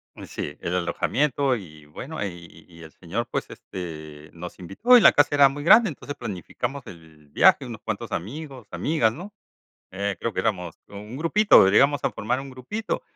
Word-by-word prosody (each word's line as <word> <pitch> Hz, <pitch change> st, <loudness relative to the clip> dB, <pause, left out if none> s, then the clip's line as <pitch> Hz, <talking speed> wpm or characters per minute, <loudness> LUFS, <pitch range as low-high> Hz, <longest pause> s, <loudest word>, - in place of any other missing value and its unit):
Eh, -, -, -10 dB
sí, 75 Hz, -, -6 dB
el 85 Hz, -, -3 dB
alojamiento 135 Hz, -, 0 dB
y 80 Hz, -8 st, -11 dB
bueno, 135 Hz, -, -7 dB
y 85 Hz, -3 st, -10 dB
y 85 Hz, -1 st, -16 dB
el 80 Hz, -, -12 dB
señor, -, -, -5 dB
pues, -, -, -3 dB
este, 80 Hz, -4 st, -9 dB
nos 90 Hz, +1 st, -9 dB
invitó, 155 Hz, -, +4 dB
y -, -, +5 dB
la -, -, +8 dB
casa 145 Hz, 0 st, +3 dB
era 140 Hz, -1 st, +7 dB
muy 145 Hz, +2 st, -7 dB
grande, 215 Hz, +5 st, +6 dB
entonces 145 Hz, -1 st, -8 dB
planificamos 120 Hz, +5 st, -5 dB
el 80 Hz, -3 st, -15 dB
viaje, -, -, +4 dB
unos -, -, -8 dB
cuantos -, -, -5 dB
amigos, 130 Hz, -, -6 dB
amigas, 130 Hz, -8 st, +1 dB
¿no? 185 Hz, -, -10 dB, 0.6 s
Eh, 100 Hz, 0 st, -3 dB
creo 115 Hz, -, -3 dB
que -, -, 0 dB
éramos 90 Hz, -7 st, -2 dB
un 105 Hz, +4 st, -9 dB
grupito, 165 Hz, -, +5 dB
llegamos 140 Hz, +8 st, +4 dB
a -, -, +2 dB
formar 120 Hz, +5 st, -2 dB
un 135 Hz, 0 st, -9 dB
grupito, 130 Hz, -, -5 dB
115 Hz, 180 wpm, -24 LUFS, 85-145 Hz, 0.6 s, la